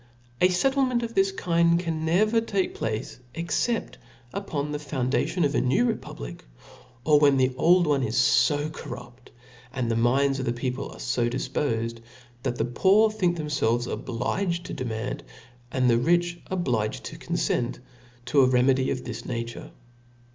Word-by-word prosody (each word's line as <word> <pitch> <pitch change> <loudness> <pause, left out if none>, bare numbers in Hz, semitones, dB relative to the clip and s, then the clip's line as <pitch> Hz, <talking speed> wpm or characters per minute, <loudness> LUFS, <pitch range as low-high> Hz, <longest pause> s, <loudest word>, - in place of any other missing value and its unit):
A 180 - +7
fettlcmcnt 255 +5 +1
of 230 0 -4
this 390 0 +3
kind 170 - +2
can 165 -3 -3
never 215 +8 +3
take 200 -4 -1
place 110 +4 -4 0.2
but 190 +7 -1 0.4
upon 150 -7 -3
the 150 - -3
foundation 145 +4 0
of 145 - 0
a - - +2
new 130 - +2
republic; - - -5 0.6
or 150 -1 +5
when 140 -2 +5
the 130 0 +2
old 175 +5 +4
one 145 -3 +2
is 115 -1 -1 0.3
fo 145 0 -1
corrupt^ 120 -4 -10 0.4
and 125 -4 -2
the - - +1
minds 135 +4 +2
of 130 - -2
the 120 - 0
people 125 +2 -3
are - - -11
fo 120 -1 0
difpofed, 115 -3 -2 0.4
that 120 - -2
the 115 - 0
poor 195 - +4
think 180 -5 0
themfelves 120 -6 0
obliged 170 - -2
to - - -6
demand^ 120 0 -3 0.5
and 130 -2 +1
the 115 -1 +4
rich 175 +5 +1
obliged 125 - -1
to - - -7
confent 120 0 -1 0.5
to, 140 +2 +4
a 130 - +5
renfiedy 130 +1 +3
of 125 - -3
this - - -6
nature. 115 -1 -5
140 Hz, 160 wpm, -26 LUFS, 125-175 Hz, 0.6 s, A